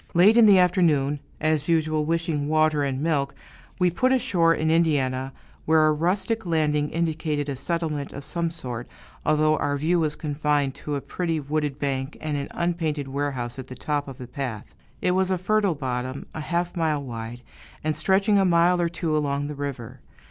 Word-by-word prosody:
Late 195 +6 +6
in 235 -2 +7
the 200 -2 +7
afternoon, 160 -6 +3 0.2
as 155 0 +1
usual 155 -2 +2
wishing 165 -2 -1
water 155 -1 +3
and 135 -1 -2
milk, 140 -4 0 0.4
we 180 -2 +3
put 255 +9 +2
ashore 180 -10 +3
in 160 -1 +1
Indiana, 135 -5 +1 0.3
where 160 0 +4
a 155 - +4
rustic 195 +8 0
landing 150 -3 +1
indicated 155 -3 -1
a 140 - -2
settlement 155 0 -2
of 140 0 -8
some 170 +2 -1
sort, 125 -7 -6 0.4
although 155 0 +3
our 145 0 0
view 165 +5 +1
was 155 -2 0
confined 145 -2 0
to 150 +2 -5
a 140 - -2
pretty, 165 0 -2
wooded 145 -1 -2
bank, 135 -1 -2
and 155 -1 -3
an 140 -1 -3
unpainted 160 -5 -2
warehouse 135 -3 -3
at 130 - -7
the 130 - -8
top 145 +3 -2
of 135 -2 -8
the 125 - -7
path. 125 -4 -5 0.3
It 180 - +3
was 190 +1 +1
a 185 - +1
fertile 200 0 +1
bottom, 130 -1 -4
a 160 - -5
half 175 +3 -2
mile 155 -4 0
wide, 120 -1 -7 0.4
and 155 0 0
stretching 200 +2 +3
a - - +4
mile 175 0 +4
or 170 - +1
two 165 -2 -2
along 145 -1 -1
the 150 - -5
river. 140 -5 -6
155 Hz, 185 wpm, -25 LUFS, 140-170 Hz, 0.4 s, in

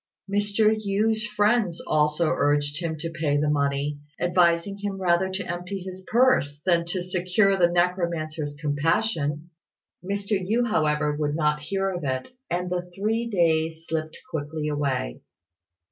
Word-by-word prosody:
Mr. 205 +2 +2
Yü's 220 +3 +1
friends 210 -4 +2
also 150 +2 +2
urged 145 +2 +1
him 160 -2 -2
to 165 +2 -5
pay 155 -3 0
the 150 +1 +1
money, 140 0 0 0.2
advising 175 +2 +2
him 200 -1 -3
rather 180 0 +2
to 190 +1 -3
empty 180 +3 -4
his 185 0 -8
purse 230 - +3
than 175 -2 +4
not 170 0 -7
secure 185 +2 +1
the 180 -2 +4
necromancer's 170 -4 -1
compassion. 155 +1 0 0.5
Mr. 200 +1 -1
Yü, 230 +6 +1
however, 150 -7 +1
would 145 -1 -1
not 150 -1 +1
hear 195 +5 -1
of 175 -3 -5
it 130 -2 -2 0.2
and 180 +1 -2
the 180 0 -2
three 225 +4 0
days 165 -5 +1
slipped 155 -1 -3
quickly 150 0 -3
away. 140 - -2
175 Hz, 145 wpm, -25 LUFS, 150-195 Hz, 0.5 s, than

